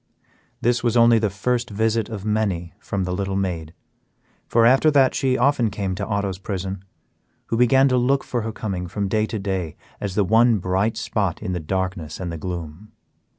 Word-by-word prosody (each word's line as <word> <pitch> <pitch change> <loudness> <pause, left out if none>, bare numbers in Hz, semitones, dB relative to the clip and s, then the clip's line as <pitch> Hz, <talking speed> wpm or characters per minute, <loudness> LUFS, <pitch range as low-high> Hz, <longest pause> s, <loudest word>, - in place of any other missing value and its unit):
This 120 0 +1
was 120 0 +2
only 115 -1 +6
the 105 -1 +1
first 120 +5 -1
visit 110 +1 0
of 105 -3 -6
many 100 -6 -1
from 100 -1 -3
the 90 - -3
little 95 +1 -2
maid, 85 -5 -2 0.8
for 115 -1 +4
after 135 +6 +5
that 135 -3 +4
she 130 -1 +1
often 125 -3 +2
came 100 -2 -3
to 100 +2 -4
Otto's 100 -3 -2
prison, 95 -1 -4 0.7
who - - 0
began 130 +3 +5
to 125 - +2
look 135 +3 +2
for 120 - -2
her 110 +1 -3
coming 95 -5 -4
from 100 +3 -2
day 110 +2 +1
to 110 - -4
day 95 -5 -3 0.2
as 100 -2 -4
the 105 - +3
one 115 +3 +4
bright 95 +4 0
spot 105 -5 -2
in 95 -4 -2
the 90 - -2
darkness 90 -1 -3
and 90 -2 -4
the 85 - -5
gloom. 85 +3 -6
105 Hz, 195 wpm, -22 LUFS, 95-115 Hz, 0.8 s, only